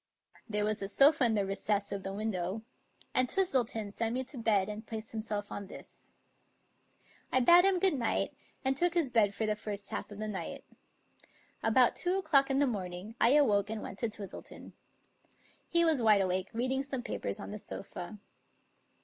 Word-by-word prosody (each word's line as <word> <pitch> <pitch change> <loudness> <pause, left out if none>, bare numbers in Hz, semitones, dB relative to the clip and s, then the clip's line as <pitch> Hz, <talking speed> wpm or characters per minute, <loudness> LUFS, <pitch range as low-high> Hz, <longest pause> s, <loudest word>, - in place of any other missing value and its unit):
There 210 -1 0
was 215 0 -1
a 195 - -2
sofa 275 +6 +5
in 225 -2 +2
the 200 -2 +1
recess 200 +1 -1
of 200 -1 -3
the 195 - -5
window, 200 0 -3 0.5
and 255 -1 +3
Twistleton 245 - 0
sent 230 +2 -1
me 260 - -1
to 260 +1 -9
bed 210 -4 +2
and 210 +1 -6
placed 220 -1 -7
himself 215 -2 -4
on 200 -1 -6
this. - - -11 1.2
I 260 - +4
bade 345 +8 +7
him 390 -1 +4
good 380 0 +5
night, 245 -5 -1 0.3
and 265 0 +2
took 350 +5 +1
his 320 -7 +1
bed 205 -4 +3
for 220 - -1
the 215 0 0
first 205 -1 -4
half - - -4
of 205 - -10
the 215 0 -4
night. 210 -3 -6 1.0
About 240 +2 +4
two 360 +2 +1
o'clock 295 -7 +3
in 270 - +1
the 285 - +4
morning 195 -3 -4
I 240 - +6
awoke 210 -9 +3
and 220 -1 -4
went 195 - -8
to 230 - 0
Twistleton. 205 -3 -9 1.0
He 340 0 +4
was 315 -6 +3
wide 215 -3 +5
awake, 185 0 -1
reading 255 +3 0
some 270 -2 -4
papers 215 - -4
on 200 - -7
the 210 - -6
sofa. 195 -1 -8
220 Hz, 185 wpm, -31 LUFS, 205-265 Hz, 1.2 s, bade